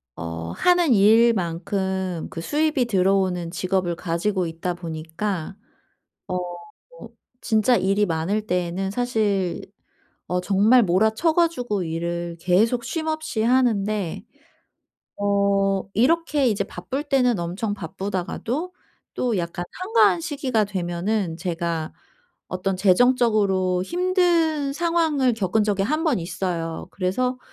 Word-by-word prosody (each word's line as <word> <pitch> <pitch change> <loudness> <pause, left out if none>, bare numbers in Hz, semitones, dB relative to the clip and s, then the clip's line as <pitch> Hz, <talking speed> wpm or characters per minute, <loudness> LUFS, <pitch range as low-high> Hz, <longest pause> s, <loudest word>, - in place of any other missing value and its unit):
어 85 0 -5
하는 355 - +3
일만큼 190 -4 +2
그 165 - -6
수입이 300 - +1
들어오는 190 -4 +1
직업을 180 -1 -1
가지고 180 +3 -1
있다 165 +2 -3
보니까 165 +2 -4 0.7
어 185 - -2 0.6
뭐 - - -10 0.3
진짜 220 +2 +3
일이 195 0 +2
많을 180 +5 -1
때에는 180 +1 -1
사실 210 -6 0 0.7
어 180 +2 -1
정말 205 +6 +4
몰아쳐 220 - +2
가지고 250 - 0
일을 170 +1 -3
계속 220 +8 +2
쉼 315 +6 -3
없이 310 -6 -2
하는데. 215 -6 +1 1.0
어 200 -1 +1
이렇게 295 - +2
이제 205 -3 +1
바쁠 270 +7 -5
때는 250 -7 +2
엄청 185 +5 -3
바쁘다가도 200 - -4 0.4
또 240 -5 0
약간 170 +1 -4
한가한 375 -2 +2
시기가 280 -9 0
되면은 185 -1 -2
제가 170 -2 -3 0.6
어떤 185 +1 -2
재정적으로 200 -3 +3
힘든 340 - +1
상황을 320 -5 +1
겪은 215 0 +1
적이 205 -2 0
1 305 +10 0
번 300 - +1
있어요. 165 -1 -4
그래서 250 +7 -1
200 Hz, 240 characters per minute, -23 LUFS, 180-250 Hz, 1.0 s, 정말